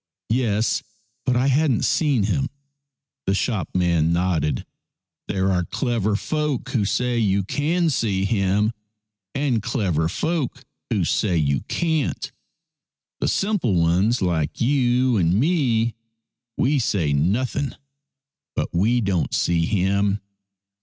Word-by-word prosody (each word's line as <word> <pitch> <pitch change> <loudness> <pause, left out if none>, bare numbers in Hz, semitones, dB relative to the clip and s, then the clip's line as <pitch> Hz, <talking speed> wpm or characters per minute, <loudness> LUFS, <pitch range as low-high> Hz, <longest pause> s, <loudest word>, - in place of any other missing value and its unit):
" - - -69
Yes, 115 -2 +1 0.5
but 125 - +3
I 125 +2 +2
hadn't 140 -3 +2
seen 145 -9 +2
him." 135 +7 0 0.8
The 95 - +2
shopman 90 -7 +1
nodded. 85 -6 0 0.3
" - - -66
There 95 0 0
are 90 -1 +1
clever 115 -4 -1
folk 150 +3 -2
who 110 -5 0
say 125 +3 0
you 100 -3 +2
can 160 - 0
see 100 -7 0
him, 100 +1 +1 0.6
and 135 -5 +1
clever 95 - 0
folk 140 - -2 0.3
who 105 -8 +1
say 90 +1 +1
you 70 -4 +1
can't. 160 -5 -1 0.9
The - - 0
simple 195 - +1
ones 90 +7 +2
like 80 -4 -1
you 125 -1 +2
and 85 -1 +2
me, 120 -7 +2 0.6
we 140 +3 +2
say 90 - 0
nothing, 120 - 0 0.8
but - - -1
we 115 +8 +2
don't 95 -5 0
see 85 -1 +1
him. 100 0 +1
110 Hz, 125 wpm, -23 LUFS, 95-130 Hz, 0.9 s, but